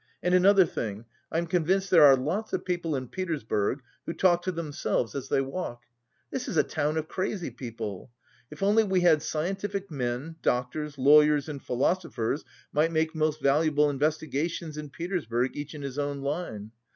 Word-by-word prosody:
And 180 - +2
another 190 +1 +6
thing, 110 -6 -5 0.3
I'm 165 +1 0
convinced 185 +3 +1
there 165 -5 +8
are 135 - +8
lots 165 +12 -3
of - - -2
people 175 -4 -1
in 130 -1 -3
Petersburg 135 - -2 0.2
who 165 - -2
talk 175 -1 +3
to 185 - -2
themselves 150 -8 -2
as 140 - -5
they - - +2
walk. 135 -4 -5 0.5
This 255 -2 -3
is 165 - -2
a 150 - +6
town 150 +3 -1
of 155 0 -2
crazy 185 -4 -3
people. 115 -4 -6 0.4
If 150 +4 -7
only 210 +3 +4
we 190 -3 +1
had 165 -4 +5
scientific 195 +5 -3
men, 135 +4 -3
doctors, 140 +4 -1
lawyers 150 +2 +5
and 145 -3 -6
philosophers 135 -1 -1 0.3
might 155 +3 +2
make 160 0 +1
most 155 -1 -1
valuable 150 +1 +3
investigations 155 +2 -1
in 150 -1 -6
Petersburg 135 - -2
each 145 +2 -6
in 145 - -7
his 140 0 -4
own 145 -1 -2
line. 140 - -4
150 Hz, 170 wpm, -28 LUFS, 135-175 Hz, 0.5 s, there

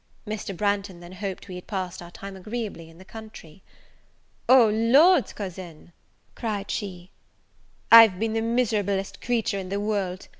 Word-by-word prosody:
Mr. 210 -3 -5
Branghton 200 -2 -1
then 175 0 -12
hoped 190 0 -6
we 185 - -8
had 180 0 -9
passed 185 -4 -4
our 175 - -10
time 195 +2 -9
agreeably 200 -4 -6
in 165 - -17
the 185 - -15
country. 215 -7 -12 0.9
"O 255 -3 +7
Lord, 255 - +4
cousin," 175 -4 -9 0.4
cried 210 -4 -4
she, 185 -3 -6 0.8
"I've 225 -5 +9
been 220 +2 -2
the 225 - 0
miserablest 210 -5 -1
creature 225 -4 -1
in 185 -1 -7
the 200 +1 -2
world! 200 -3 -3
200 Hz, 150 wpm, -25 LUFS, 185-225 Hz, 0.9 s, I've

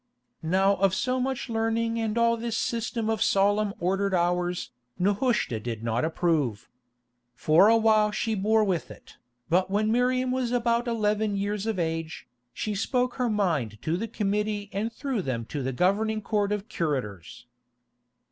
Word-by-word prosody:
Now 190 +4 +2
of 195 -1 +2
so 255 +4 0
much 265 +1 -2
learning 225 0 0
and 225 0 -1
all 235 0 +3
this 230 -1 -3
system 230 -1 -2
of 220 -3 -1
solemn 205 +1 +2
ordered 195 +2 0
hours, 175 0 0 0.3
Nehushta 205 - +1
did 115 0 -5
not 115 +1 0
approve. 150 - 0 0.7
For 155 - +5
a 230 +1 +6
while 215 -1 +4
she 220 +1 -2
bore 215 +2 +2
with 185 -5 -1
it, - - -14 0.3
but 185 +2 +2
when 215 +2 +1
Miriam 250 +2 +1
was 255 -2 -1
about 240 0 +1
eleven 215 -2 0
years 205 +1 -2
of 220 -3 -1
age, 165 -1 -3 0.2
she 215 - -3
spoke 245 +4 -1
her 250 -2 +1
mind 165 - 0
to 160 - 0
the 220 +6 -3
Committee 210 0 -2
and 215 +4 -2
through 265 -3 -3
them 125 -7 -3
to 145 - -3
the 130 +1 -2
governing 210 - +1
Court 205 -1 0
of 210 0 -2
Curators. 120 - -4
205 Hz, 160 wpm, -26 LUFS, 175-225 Hz, 0.7 s, a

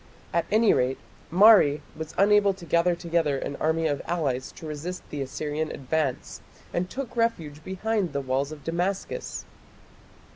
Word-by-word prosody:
At 170 - +1
any 220 +1 +4
rate 130 +1 +1 0.3
Mari 180 -5 +6
was 160 0 -7
unable 200 0 +4
to 180 -3 -11
gather 170 +2 +2
together 165 -4 0
an 140 - -4
army 160 +1 +1
of 145 -3 0
allies 140 -7 -1
to - - -11
resist 155 +4 -6
the 145 - -3
Assyrian 150 +3 -3
advance, 140 -1 -2 0.3
and 180 +1 -1
took 265 -2 -6
refuge 165 -11 -1
behind 190 0 -1
the 140 - -1
walls 135 +2 -1
of 150 -2 -9
Damascus. 185 - -3
165 Hz, 150 wpm, -26 LUFS, 145-190 Hz, 0.3 s, Mari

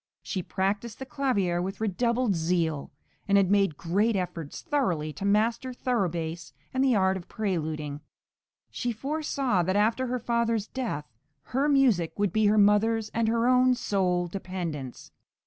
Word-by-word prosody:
She 190 - -3
practised 200 +5 -2
the 265 - -6
clavier 220 -10 0
with 190 +2 -4
redoubled 235 +2 +1
zeal, 165 -3 0 0.4
and 200 0 +4
had 195 -1 +3
made 195 -7 +3
great 205 +6 +1
efforts 175 -5 -4
thoroughly 185 - 0
to 175 +8 -5
master 230 +5 +1
thorough 240 -6 0
bass 165 0 -5 0.2
and 260 0 +2
the 260 -3 +3
art 190 -1 +2
of 175 - -10
preluding; 155 -8 -3 0.7
she 245 - -2
foresaw 270 - -1
that 185 +3 0
after 225 +5 +2
her 250 +1 -1
father's 230 -2 0
death 220 - -4 0.5
her 275 +3 +2
{MANNHEIM.} 285 - +4
(416) 270 - +5
music 175 -10 +1
would 205 -3 0
be 215 -1 +3
her 210 +1 +3
mother's 215 +2 +3
and 230 0 0
her 230 +1 +2
own 255 0 +5
sole 180 -6 0
dependence. 170 -8 -6
205 Hz, 165 wpm, -27 LUFS, 175-235 Hz, 0.7 s, 416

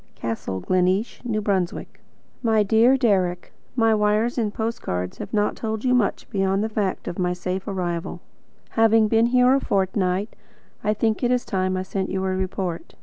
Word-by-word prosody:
Castle 110 -4 -4
Gleneesh, 185 - 0
N. 225 -3 -1 0.4
B. - - -18 0.5
My 220 -3 +3
dear 230 +6 +4
Deryck: 185 -8 +1 0.2
My 225 -2 +3
wires 215 +3 +2
and 215 -3 0
post 230 +2 -3
cards 90 0 -4
have - - -6
not 210 -1 +1
told 220 +1 -4
you 250 - +3
much 245 -5 +1
beyond 195 0 +1
the 220 - -1
fact 205 -3 -2
of 175 - -5
my 180 -1 +1
safe 185 +2 -4
arrival. 175 -4 -3 0.5
Having 225 -1 +4
been 225 +1 +4
here 250 +1 +4
a 275 - +4
fortnight, 190 -1 0 0.5
I 210 +1 +1
think 220 0 0
it 245 - +1
is 250 -1 +1
time 185 -1 -1
I 185 - -2
sent 190 0 -3
you 190 0 -2
a 190 0 0
report. 185 -2 -4
205 Hz, 180 wpm, -23 LUFS, 185-225 Hz, 0.5 s, dear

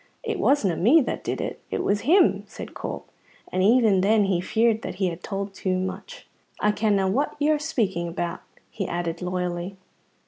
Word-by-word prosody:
"It 445 -4 -3
wasna 220 - +2
me 235 - +5
that - - -3
did - - -3
it; - - -4
it - - -2
was 205 +1 +1
him," 205 - +5
said 220 - -9
Corp, - - -6 0.4
and 185 - 0
even 215 -2 +4
then 210 +2 +4
he 190 -3 +1
feared 225 +3 +1
that - - -5
he 185 -1 0
had 170 0 -7
told 195 0 -4
too 185 -1 -1
much. 190 - -6 0.3
"I 210 - +3
kenna 205 -2 +1
what 250 +10 0
you're 300 +1 +2
speaking 215 - -1
about," 170 0 -4 0.3
he 195 -4 -4
added 170 0 -3
loyally. 180 +1 -3
195 Hz, 180 wpm, -25 LUFS, 185-230 Hz, 0.4 s, me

